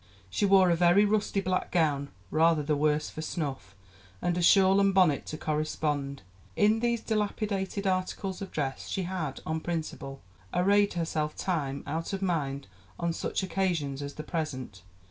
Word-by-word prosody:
She 205 - +1
wore 190 -2 +6
a - - +4
very 175 +4 +5
rusty 205 -1 +1
black 185 -1 -1
gown, 145 -4 +1 0.2
rather 160 -1 +3
the 150 +1 +1
worse 150 +1 +1
for 155 - -6
snuff, 135 - -4 0.4
and 175 -1 0
a 180 - 0
shawl 190 +2 +6
and 195 -1 +3
bonnet 175 -7 +3
to 155 - -5
correspond. 150 -3 -2 0.3
In 215 +2 +4
these 235 -1 0
dilapidated 205 -2 -2
articles 185 +1 -1
of 195 - -5
dress 135 -3 -3
she 190 - -1
had, 170 -7 -4
on 160 0 -1
principle, 155 -5 -5 0.3
arrayed 200 +3 +3
herself, 160 -3 -2
time 140 -7 -2
out 165 +6 -3
of 195 0 -2
mind 140 -6 -1 0.3
on 170 -1 0
such - - -2
occasions 170 -8 -1
as 140 0 -6
the 155 - -6
present 130 - -4
170 Hz, 165 wpm, -29 LUFS, 150-190 Hz, 0.4 s, wore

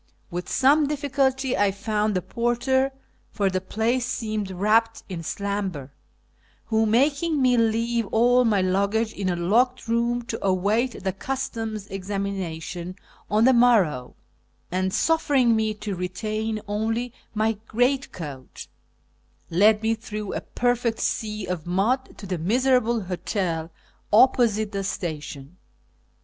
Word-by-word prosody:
With 175 +1 -4
some 285 +3 +4
difficidty 270 -2 0
I 205 -1 +3
found 210 +1 -1
a 180 - -2
porter 240 +6 +1 0.4
(for 200 -3 0
the 185 0 -1
place 230 +6 0
seemed 215 -5 -3
wrapped 215 +5 +1
in 180 -4 -5
slumber), 190 -6 -3 0.7
who, 220 0 +1
making 285 +7 +2
me 255 -2 +4
leave 230 0 +1
all 245 +4 +4
my 210 -5 +2
luggage 200 +4 +1
in 190 -2 -2
a 175 - 0
locked 235 +9 +1
room 235 +1 0
to 240 - -5
await 205 +5 +1
the 190 -1 -1
Customs' 225 -2 -4
examination 185 -3 -4 0.3
on 215 +3 +3
the 260 - +6
morrow, 210 - +3 0.6
and 185 +1 0
suffering 280 -5 +3
me 220 -1 +1
to 210 -1 -5
retain 215 +4 -3
only 225 +4 -2 0.2
my 215 0 0
greatcoat, 220 - -2 0.9
led 210 +5 +4
me 225 +1 +2
through 215 -2 -5
a - - -3
perfect 245 -2 0
sea 215 -2 -2
of 175 -3 -4
mud 215 +9 0
to - - -9
the 180 -3 -3
miserable 240 +4 +2
hotel 180 -3 -2 0.4
opposite 220 -2 +4
the 195 -1 -3
station. 155 -5 -5
215 Hz, 130 wpm, -24 LUFS, 190-240 Hz, 0.9 s, the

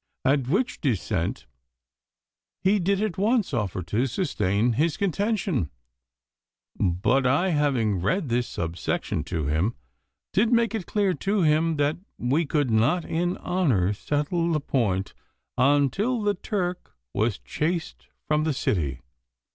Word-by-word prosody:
At 135 -1 +2
which 205 - 0
dissent 105 - -1 1.2
he 200 +2 +4
did 195 +3 +1
at 195 -5 -2
once 215 - +2
offer 100 -6 -1
to 110 +10 0
sustain 115 - 0
his 155 +5 +1
contention, 200 - 0 1.1
but 110 +9 +2
I, 145 +9 +2
having 135 - +1
read 145 - 0
this 120 0 0
subsection 80 -2 -2
to 80 -4 -2
him, 80 +10 0 0.6
did 220 +4 +3
make 230 -2 +3
it 215 -6 -3
clear 200 -3 +1
to 200 +1 0
him 155 +1 +2
that 145 +1 +1 0.2
we 140 +6 +1
could 145 -5 +1
not 125 +11 +2
in 175 +2 -1
honour 130 - +1
settle 150 - -1
the 155 - +2
point 105 -9 -1 0.4
until 145 - +2
the 205 0 +2
Turk 180 -2 -3 0.2
was 110 -2 +1
chased 165 +1 -3 0.2
from 150 0 +2
the 155 -1 +1
city. 75 - -1
145 Hz, 130 wpm, -25 LUFS, 110-185 Hz, 1.2 s, he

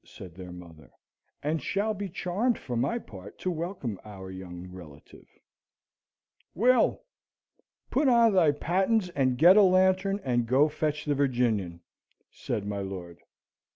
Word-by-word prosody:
said 90 -4 -12
their 90 0 -10
mother, 85 -4 -13 0.5
"and 155 +1 -1
shall 205 - -1
be 200 -1 -5
charmed 200 +8 -1
for 125 - -6
my 175 - 0
part 100 - -11
to 185 - -2
welcome 165 - -4
our 95 -3 -10
young 90 -1 -9
relative." 85 -6 -14 1.3
"Will! 245 +5 +3 0.9
Put 280 +2 +2
on 235 -3 +5
thy 170 -6 +4
pattens 190 +6 0
and 130 -6 0
get 175 +8 +7
a - - +8
lantern, 190 +1 +3
and 120 -3 0
go 135 +5 +4
fetch 150 -1 -2
the 145 - +1
Virginian," 120 -11 0 0.5
said 100 - -4
my 100 0 -3
lord. 90 -3 -7
145 Hz, 140 wpm, -28 LUFS, -, 1.3 s, a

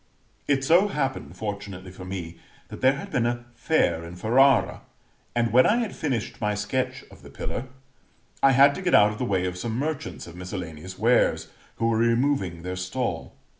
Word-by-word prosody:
It 135 -2 +2
so 170 +8 +5
happened, 135 - -3
fortunately 100 -3 -6
for 90 0 -10
me, 90 -3 -6 0.3
that - - -9
there 130 +1 +5
had 140 - -8
been 120 -1 +1
a 120 0 -3
fair 120 - +1
in 85 +1 -9
Ferrara; 125 +6 +3 0.5
and, 115 -2 +1
when 130 +1 +6
I 225 - +3
had 235 -4 -2
finished 120 -8 -3
my 105 -1 0
sketch 130 +5 -2
of - - -15
the - - -13
pillar, 125 - -5 0.8
I 135 - +6
had 140 +2 +6
to 185 - -6
get 180 -1 +3
out 105 +1 +6
of 105 - -8
the 125 - -1
way 95 -5 0
of 90 0 -4
some 115 +4 -3
merchants 150 +2 -4
of 85 - -11
miscellaneous 90 -1 -7
wares, 120 +4 +2 0.3
who 115 - 0
were 115 -1 +1
removing 115 -7 +1
their 90 +1 -4
stall. 95 +8 -3
115 Hz, 190 wpm, -25 LUFS, 95-135 Hz, 0.8 s, when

